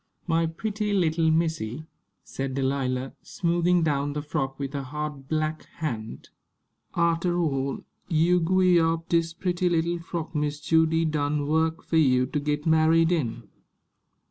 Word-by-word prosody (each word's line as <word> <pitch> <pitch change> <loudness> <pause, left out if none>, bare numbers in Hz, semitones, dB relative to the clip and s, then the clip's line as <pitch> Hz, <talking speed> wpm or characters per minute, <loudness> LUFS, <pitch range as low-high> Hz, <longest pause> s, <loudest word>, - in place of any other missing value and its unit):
"My 165 -1 +1
pretty 210 +5 -3
little 165 -4 +2
missy," 160 -5 -1 0.4
said 135 -1 -4
Delilah, 130 -1 -1
smoothing 175 0 +1
down 145 -2 0
the 150 0 -3
frock 135 -3 -3
with 140 0 -4
her 140 - -2
hard 145 0 -6
black 155 0 -2
hand. 115 -9 -5 0.7
"Arter 170 +1 +1
all, 140 -5 -1 0.3
you 170 +1 +3
gwi' 180 +1 +3
w'yar 165 0 +2
dis 165 -1 +1
pretty 180 0 0
little 170 0 0
frock 170 -1 -5
Miss 150 -1 -1
Judy 160 +1 +2
done 150 -1 0
wuk 160 +2 0
for 165 - 0
you 130 -5 +4
to 150 - -2
git 150 +1 -2
married 160 +1 +4
in." 150 -10 -2
160 Hz, 145 wpm, -26 LUFS, 145-170 Hz, 0.7 s, you